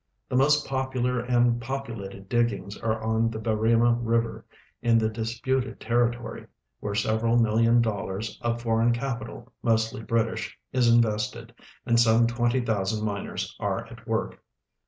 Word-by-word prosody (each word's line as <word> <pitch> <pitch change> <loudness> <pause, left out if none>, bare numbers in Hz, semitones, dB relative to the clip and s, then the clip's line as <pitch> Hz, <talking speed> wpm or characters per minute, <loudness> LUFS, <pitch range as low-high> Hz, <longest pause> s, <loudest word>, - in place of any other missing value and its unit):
JJie 125 - +2
most 150 +2 +4
poi)ular 130 -2 -1
and 120 -1 +3
po])ulate<l 115 -7 -6
diggings 115 -3 0
are 110 -1 -2
on 110 +1 +1
the 110 - -5
Harima 115 +2 +2
liver, 115 0 0 0.4
in 115 -1 +4
the 110 -1 +2
disputed 120 +4 -2
territory, 120 0 -1 0.3
Avhere 105 0 -1
several 110 +3 +1
million 115 +1 +4
dollars 105 -1 -3
of 120 0 -2
foreign 115 +1 +2
ca]tital, 120 -1 -5
mostly 110 -1 +1
British, 115 0 -1 0.2
is 125 -2 +3
invested, 110 -3 +1 0.3
and 115 0 +3
some 115 0 +5
twenty 120 +2 +1
thousand 105 -1 -1
miners 100 -1 -4
are - - -2
at - - -12
AVork. - - -2
115 Hz, 135 wpm, -26 LUFS, 110-120 Hz, 0.4 s, some